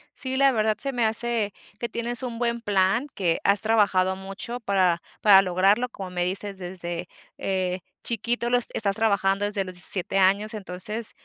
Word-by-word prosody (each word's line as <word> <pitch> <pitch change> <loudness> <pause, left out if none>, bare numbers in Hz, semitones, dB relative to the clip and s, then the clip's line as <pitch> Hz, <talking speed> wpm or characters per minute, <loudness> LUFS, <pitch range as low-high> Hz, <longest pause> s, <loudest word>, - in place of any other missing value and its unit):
Sí, 260 -1 -2
la 275 0 +4
verdad, 215 -3 +1
se 275 -1 -4
me 240 -2 +1
hace 220 -2 +1 0.3
que 235 - -3
tienes 235 +1 -3
un 235 -2 -5
buen 235 -1 -1
plan, 205 +4 +1
que 175 -4 0
has 200 +1 +4
trabajado 200 -4 +2
mucho 195 +5 -7
para 185 -6 +1 0.2
para 200 -2 +8
lograrlo, 195 +6 +2
como 195 -5 -8
me 180 -1 -2
dices, 195 +2 -4
desde, 175 -1 -6 0.3
eh, 185 -1 -2 0.2
chiquito 235 +1 0
lo 245 - +3
es 245 - -2
estás 200 -2 +1
trabajando 200 -2 +1
desde 205 -1 -1
los 185 -1 -8
17 185 +1 +2
años. 200 +3 +2
Entonces, 210 +3 -4
205 Hz, 175 wpm, -25 LUFS, 190-235 Hz, 0.3 s, para